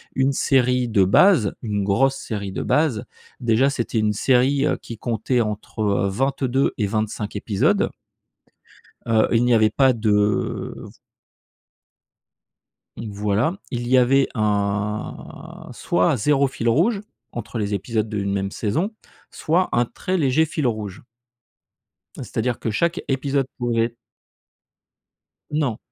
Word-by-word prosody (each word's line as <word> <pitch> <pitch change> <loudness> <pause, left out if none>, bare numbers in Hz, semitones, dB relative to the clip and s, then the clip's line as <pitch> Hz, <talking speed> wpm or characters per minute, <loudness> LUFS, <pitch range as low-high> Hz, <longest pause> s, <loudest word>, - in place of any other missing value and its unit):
Une 135 +1 +2
série 125 -2 +2
de 100 -4 +3
base, 120 - +4
une 105 -3 -2
grosse 135 +8 +2
série 100 -6 -5
de - - -4
base, 140 -5 +1 0.3
déjà 120 +3 +3
c'était 120 -4 -2
une 105 -1 +2
série, 130 +6 +2
heu, - - +1
qui 115 - -8
comptait 115 +3 -1
entre, 105 -1 -3
heu, 100 -1 +1
22 135 +4 0
et 105 - 0
25 110 0 -3
épisodes. 100 -1 +1 1.2
Heu, 110 -1 +3
il 115 0 +3
n'y 125 - +3
avait 110 -1 +4
pas 130 +3 +3
de 105 -3 0 2.2
Mmh, 110 - -6
voilà. 105 - 0
Il 120 -1 -3
y 130 +1 +4
avait 135 +2 +4
un 105 -1 -3
soit 90 +9 +1
0 140 +4 +2
fil 120 -3 -2
rouge, 195 - +2 0.3
entre 120 0 -5
les 105 -1 -2
épisodes 110 +2 -2
d'une 100 -2 -2
même 100 0 -2
saison, 160 - -1 0.4
soit 175 +4 0
un 120 0 +2
très 185 +9 -3
léger 155 0 +3
fil 155 -2 -3
rouge. 105 -5 -4 1.1
Heu, - - -5
c'est-à-dire 120 +1 -2
que 115 - -2
chaque 170 - 0
épisode 135 0 0
pouvait 115 -1 0 1.6
Non, 145 -7 0
115 Hz, 130 wpm, -22 LUFS, 105-135 Hz, 2.2 s, base